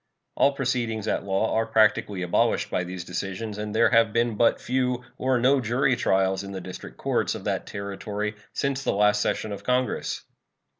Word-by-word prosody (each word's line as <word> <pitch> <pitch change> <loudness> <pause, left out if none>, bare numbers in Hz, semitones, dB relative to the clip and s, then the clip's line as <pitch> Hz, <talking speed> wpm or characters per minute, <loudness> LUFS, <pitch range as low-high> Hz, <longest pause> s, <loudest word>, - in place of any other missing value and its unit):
All 140 - +3
proceedings 120 -5 -1
at - - -1
law 95 +3 0
are 110 0 +1
practically 105 -3 +2
abolished 90 - +1
by 90 - 0
these 90 0 -6
decisions, 100 +4 -4
and 105 0 -4
there 115 +1 +4
have 115 -2 +4
been 115 +1 +1
but 115 +2 +3
few 125 -1 -1 0.2
or 130 0 +2
no 130 +3 +3
jury 125 +3 +2
trials 95 -4 +1
in 100 0 -7
the 95 - -4
district 90 0 -9
courts - - 0
of - - -7
that - - -2
Territory 105 +1 -4 0.2
since 135 -1 -1
the - - +1
last 105 +1 +3
session 110 - -1
of 100 - -6
Congress. 125 0 -1
110 Hz, 185 wpm, -25 LUFS, 100-125 Hz, 0.2 s, there